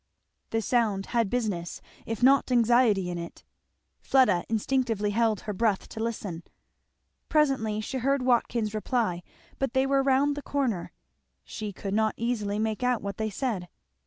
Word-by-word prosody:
The 225 0 -1
sound 210 -4 +1
had 230 -4 +2
business, 200 -8 -2 0.3
if 225 +1 -3
not 270 0 +5
anxiety, 235 -6 +3
in 175 - -4
it. 170 0 -9 0.6
Fleda 210 -10 +3
instinctively 225 -2 0
held 220 -2 +1
her 210 - -4
breath 205 -1 0
to - - -8
listen. 205 -7 -4 0.9
Presently 265 -9 +2
she 260 +4 -4
heard 275 +1 +1
Watkins 235 -3 +1
reply; 215 -5 -1 0.4
but 270 -3 -1
they 265 0 +3
were 275 0 +2
round 275 +2 +2
the 290 - -5
corner, 260 -12 -2 0.5
she 210 - -6
could 195 +1 -5
not 220 0 +1
easily 215 -4 -1
make 220 +1 -1
out 250 -2 +1
what 200 0 -4
they 220 0 -1
said. 205 -5 -3
225 Hz, 155 wpm, -27 LUFS, 205-255 Hz, 0.9 s, not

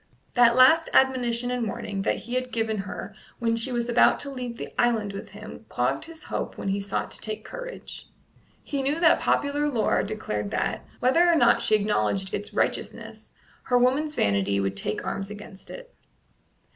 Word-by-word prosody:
That 240 -1 +5
last 290 +6 +6
admonition 245 -2 +2
and 245 -2 -1
warning 200 -1 -4
that 195 - +1
he 240 - -6
had 255 0 -1
given 225 -2 -1
her 195 +1 -6 0.2
when 230 -1 0
she 230 +3 +1
was 240 -1 -1
about 240 0 +4
to 280 - -6
leave 250 -3 -6
the - - -7
island 225 -4 +1
with 200 - -7
him - - -11
clogged - - -1
his 325 -1 -10
hope - - -4
when - - -3
he 195 +1 0
sought 200 0 -3
to - - -3
take 215 -1 -5
courage. - - -8 0.6
He 280 -2 -3
knew 285 +4 0
that 335 -1 +5
popular 290 +1 +1
lore 235 -6 +1
declared 105 - -4
that, - - -2 0.2
whether 330 +8 +4
or - - +4
not 315 - +4
she 215 - +4
acknowledged 190 - 0
its 205 - -4
righteousness, - - -3 0.3
her 245 - +3
woman's 275 +5 +2
vanity 100 - +1
would 95 0 -1
take 105 +2 -3
arms 195 0 -3
against 205 -2 -10
it. - - -10
235 Hz, 185 wpm, -26 LUFS, 200-265 Hz, 0.6 s, last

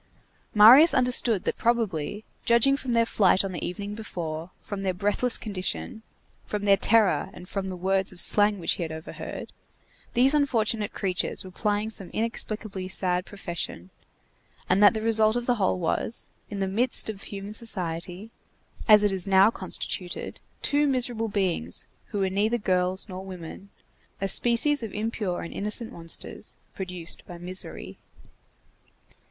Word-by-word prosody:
Marius 250 +10 +8
understood 245 -5 +3
that - - -3
probably, 210 -5 -1 0.2
judging 235 +4 +4
from 260 -3 -3
their 230 0 +3
flight 195 -3 +3
on 195 - -4
the 175 - -6
evening 200 +3 -5
before, 170 -6 -6
from 200 -1 -6
their 190 -2 -1
breathless 205 +6 +1
condition, 215 +3 -4 0.4
from 210 -1 -4
their 200 -1 +5
terror 210 -1 +2
and 180 - -11
from 195 0 -3
the 185 - -5
words 190 +1 +1
of 185 - -10
slang 205 +3 +6
which 170 - -1
he - - -2
had 165 -2 -3
overheard, 160 0 -8 0.6
these 260 +4 +4
unfortunate 225 -7 +1
creatures 185 -2 -2
were 185 - -10
plying 210 +2 -1
some 195 -4 -5
inexplicably 215 -4 -3
sad 180 -1 0
profession, 175 - -6 0.8
and 185 +2 +2
that 205 +1 +7
the 220 - -2
result 220 -1 +3
of 240 0 -2
the 245 -1 +1
whole 185 0 +2
was, 180 +6 -1 0.2
in 205 - -5
the 195 - 0
midst 230 +6 +2
of 210 -3 -5
human 200 +1 -7
society, 185 -2 -1 0.6
as 210 -2 +7
it 205 - +3
is 190 -1 -2
now 195 +2 +5
constituted, 185 -2 -4 0.2
two 290 0 +2
miserable 245 -4 0
beings 185 - -1 0.2
who 210 - -5
were 195 -1 +1
neither 215 +5 +1
girls 185 -2 0
nor 185 -1 -7
women, 185 +1 -9 0.5
a 195 - -1
species 240 +8 +3
of 225 -4 -6
impure 210 -4 -3
and 165 - -8
innocent 210 +3 -2
monsters 165 -1 -3 0.2
produced 180 -3 -5
by 175 - -9
misery. 180 +2 -5
200 Hz, 155 wpm, -26 LUFS, 185-225 Hz, 0.8 s, Marius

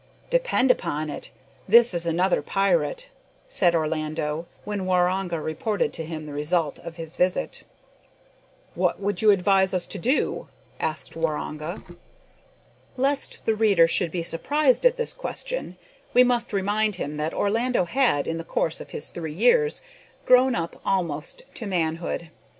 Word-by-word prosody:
"Depend 485 - +3
upon 155 -8 -2
it, - - -7 0.4
this 235 +2 +6
is 170 -1 -1
another 175 +3 +2
pirate," 340 - 0 0.4
said 180 - +2
Orlando, 155 0 -2 0.2
when 200 -2 -3
Waroonga 180 -1 +1
reported 170 +7 -1
to 165 - -3
him 160 -1 -6
the 150 -1 -8
result 150 +1 0
of 170 -1 -9
his 165 -1 -7
visit. 180 0 0 1.1
"What - - 0
would 200 -2 -2
you 215 - +5
advise 190 -1 +4
us 180 - +1
to 200 - -6
do?" 255 - 0 0.3
asked 160 0 -3
Waroonga. 155 +1 -3 1.1
Lest 275 +2 -1
the 225 - +3
reader 205 -6 +4
should 170 +1 +1
be 170 +1 -3
surprised 285 - +3
at - - 0
this 480 - -1
question, - - -5 0.4
we 250 - +8
must 245 -1 0
remind 205 +1 +1
him 150 -4 -4
that 155 +1 -1
Orlando 230 0 +1
had, 230 - +1
in 165 0 -2
the - - -5
course 165 0 -1
of - - -9
these - - -5
three 160 -3 -5
years, 450 - +3 0.4
grown 255 0 +5
up 170 0 -4
almost 175 - -1
to 225 - -6
manhood. 170 -2 -2
185 Hz, 150 wpm, -25 LUFS, 165-230 Hz, 1.1 s, we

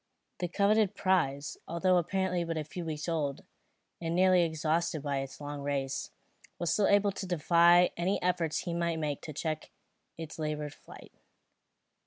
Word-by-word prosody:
The 180 - -1
coveted 205 +2 +2
prize, 150 -8 0
although 180 +2 +2
apparently 180 +1 0
but 165 -1 -3
a 155 - -1
few 170 +4 -7
weeks 155 -1 -4
old, 150 -5 -1 0.6
and 165 0 -2
nearly 185 0 +5
exhausted 160 -1 0
by 140 -2 -1
its 135 0 -6
long 145 -1 -6
race, 140 -1 -2 0.5
was 170 -2 0
still 205 - +3
able 205 0 +4
to 190 0 -6
defy 175 +1 +5
any 180 +4 0
efforts 175 -3 0
he 170 - -3
might 170 -1 0
make 150 -3 -2
to 155 - -7
check 155 +1 -3 0.5
its 160 0 -8
laboured 150 -1 -3
flight. - - -14
170 Hz, 160 wpm, -30 LUFS, 150-180 Hz, 0.6 s, nearly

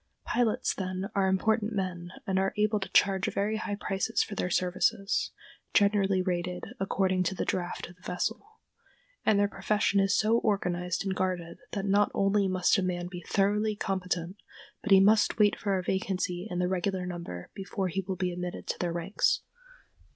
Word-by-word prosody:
] - - -48
Pilots, 235 -2 +1
then, 185 +1 -4
are 195 -1 +2
important 215 +3 +1
men 180 -3 -3 0.2
and 190 -1 +1
are 195 0 0
able 210 0 +2
to 195 - -5
charge 190 -2 +3
very 210 +2 0
high 205 -2 -3
prices 200 +2 0
for - - -7
their 180 - -1
services 185 +3 +1 0.5
(generally 200 -2 +3
rated 180 -1 -2 0.2
according 190 -1 +1
to 185 +1 0
the - - -2
draft 175 -1 -2
of 175 - -14
the - - -27
vessel), 220 +7 -2 0.8
and 215 - +4
their 205 0 +4
profession 205 -1 +1
is 195 0 +3
so 225 +2 +3
organized 180 -5 -1
and 190 - 0
guarded 180 -3 -2
that 195 -2 -2
not 200 +1 +3
only 195 0 +2
must 185 +2 +3
a - - +1
man 175 -1 -2
be 180 -2 -7
thoroughly 210 +2 +2
competent, 185 -2 -2 0.4
but 210 - -5
he 195 -1 +8
must 210 +2 +4
wait 210 -2 +4
for 200 -3 -1
a 185 - -2
vacancy 185 0 -1
in 180 - -3
the 180 0 +1
regular 185 0 -1
number 170 - -6
before 195 0 -3
he 190 +2 -2
will 190 0 -4
be 180 0 -1
admitted 180 0 -5
to - - -3
their 175 -1 -1
ranks. 175 +4 +1
190 Hz, 185 wpm, -29 LUFS, 180-205 Hz, 0.8 s, he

